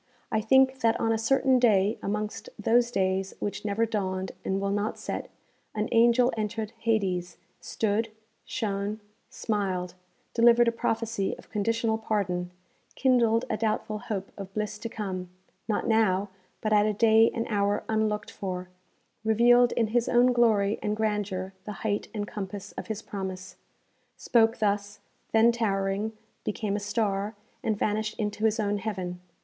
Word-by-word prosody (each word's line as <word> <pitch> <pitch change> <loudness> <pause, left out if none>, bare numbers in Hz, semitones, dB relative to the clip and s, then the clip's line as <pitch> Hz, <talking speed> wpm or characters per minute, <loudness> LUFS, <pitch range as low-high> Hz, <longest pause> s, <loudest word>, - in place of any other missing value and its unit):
I 220 - +1
think 265 +3 +4
that 230 -2 +2
on 225 - +1
a 225 - +2
certain 265 +2 +3
day 210 -3 +3
amongst 210 - -3
those 240 +1 +3
days 190 -3 0
which 205 - -3
never 215 +2 +1
dawned, 190 -4 -2
and 190 0 -1
will 200 0 -1
not 205 +2 -1
set, - - -5 0.5
an 215 +1 0
angel 240 +2 +4
entered 215 0 -3
Hades, 190 -6 0 0.2
stood, 220 +1 -1 0.3
shone, 205 -2 -3 0.3
smiled, 190 -4 -2 0.4
delivered 235 0 +5
a - - +4
prophecy 225 -3 -1
of - - -17
conditional 225 +1 0
pardon, 180 -5 -1 0.5
kindled 240 -3 +3
a 220 - -1
doubtful 215 -1 -1
hope 195 -2 -4
of 195 -1 -7
bliss 210 0 -3
to 230 - -5
come, 190 -5 -4 0.4
not 215 - 0
now, 210 -4 +2 0.3
but 215 0 +1
at 210 0 +5
a 215 - +1
day 225 +1 +5
and 230 - -2
hour 205 -1 +1
unlooked 215 -1 0
for, 185 -2 -5 0.5
revealed 240 +2 +5
in 225 -2 +1
his 240 +1 +1
own 245 +1 +5
glory 215 -4 +3
and 210 0 -1
grandeur 205 -3 -1
the 210 - -5
height 205 -1 0
and 205 -2 -4
compass 200 0 -6
of - - -7
his 220 -1 -4
promise 190 -2 -6 0.6
spoke 225 -1 +3
thus, 205 -1 -1 0.3
then 225 +1 +5
towering, 205 -2 -1 0.3
became 210 -1 -2
a - - -1
star, 205 0 -1 0.3
and 215 -2 0
vanished 215 +1 -1
into 210 0 -2
his 220 +1 +2
own 205 -1 0
heaven. 185 -4 -4
215 Hz, 155 wpm, -27 LUFS, 200-225 Hz, 0.6 s, delivered